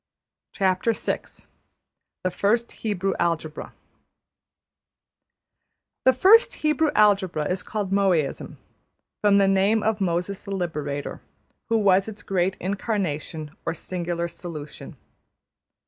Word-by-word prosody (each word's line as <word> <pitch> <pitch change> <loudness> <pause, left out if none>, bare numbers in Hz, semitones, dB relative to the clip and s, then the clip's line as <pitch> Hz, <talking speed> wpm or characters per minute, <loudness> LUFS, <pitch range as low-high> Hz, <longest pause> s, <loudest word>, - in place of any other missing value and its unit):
\chapter{The 195 +3 -1 0.8
First 225 +6 +1
Hebrew 195 -3 -2
Algebra} 160 -2 -2 2.3
The 260 - +7
first 410 - +6
Hebrew 305 +1 +3
algebra 195 -7 +3
is 180 0 -2
called 205 -3 -4
Mosaism, 185 -8 0 0.6
from 205 -1 +5
the 195 -1 +4
name 195 +3 +3
of 220 -1 0
Moses 180 +2 -1
the 200 -1 -3
Liberator, 150 -6 -4 0.5
who 225 - +3
was 195 -2 +3
its 215 -1 -8
great 190 0 0
Incarnation, 180 -6 -3
or 165 - -2
Singular 170 0 -3
Solution. 170 -3 -9
190 Hz, 100 wpm, -24 LUFS, 170-210 Hz, 2.3 s, The